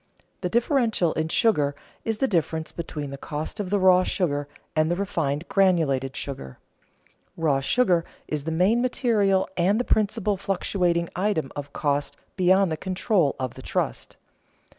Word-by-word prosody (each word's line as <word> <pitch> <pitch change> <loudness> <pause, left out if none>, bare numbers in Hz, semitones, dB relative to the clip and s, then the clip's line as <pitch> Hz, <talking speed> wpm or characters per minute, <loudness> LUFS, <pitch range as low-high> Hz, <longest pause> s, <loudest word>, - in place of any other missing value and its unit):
The 180 - -1
differential 230 - +2
in 160 0 -1
sugar 150 -8 +2 0.3
is 225 -1 -1
the 270 - +1
difference 160 - -1
between 150 -4 -5
the 140 - -7
cost 150 +9 -5
of 200 -3 -3
the 205 - +2
raw 185 -1 +6
sugar 145 -7 -1 0.3
and 155 0 +2
the 175 - +1
refined 165 -5 -2
granulated 155 -9 +2
sugar. 65 - -6 0.8
Raw 155 -5 +2
sugar 175 - +2 0.2
is 150 -2 -3
the 160 - -2
main 190 +9 +3
material 215 -6 +2
and 190 +5 +2
the - - +1
principal 210 -1 +1
fluctuating 180 -3 0
item 185 -7 0
of 145 0 -6
cost 145 -1 -1 0.2
beyond 185 0 +3
the 160 - -1
control 185 -3 +1
of 130 -2 -3
the - - -11
trust. - - -3
175 Hz, 155 wpm, -25 LUFS, 150-200 Hz, 0.8 s, raw